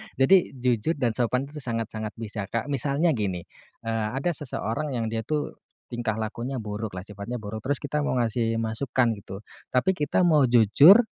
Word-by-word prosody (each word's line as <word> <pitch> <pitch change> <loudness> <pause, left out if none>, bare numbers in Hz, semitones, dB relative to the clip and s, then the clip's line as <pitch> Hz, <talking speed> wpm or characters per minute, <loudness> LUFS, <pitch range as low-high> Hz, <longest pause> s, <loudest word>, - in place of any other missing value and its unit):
jadi 135 +9 +6 0.2
jujur 125 +5 +1
dan 125 -5 +1
sopan 125 +3 0
itu 150 - -7
sangat-sangat 115 -3 -4
bisa, 105 -3 -5
Kak. 115 +7 -3
Misalnya 140 +5 +2
gini, 100 - -2 0.4
eee, 115 -1 -1
ada 155 +6 0
seseorang 140 -2 -3
yang 115 -2 -1
dia 115 - -1
tuh 150 -1 -2 0.3
tingkah 120 -3 -1
lakunya 115 +3 -4
buruk 105 -1 -4
lah, 90 - -5
sifatnya 105 +4 -6
buruk 105 +1 -5
terus 135 +6 -1
kita 150 +1 -1
mau 145 -3 0
ngasih 115 0 0
masukan 115 +2 +1
gitu, 95 +1 -9 0.3
tapi 130 +9 +2
kita 150 0 +1
mau 150 -6 +5
jujur, 140 - +7
120 Hz, 170 wpm, -26 LUFS, 110-140 Hz, 0.4 s, jujur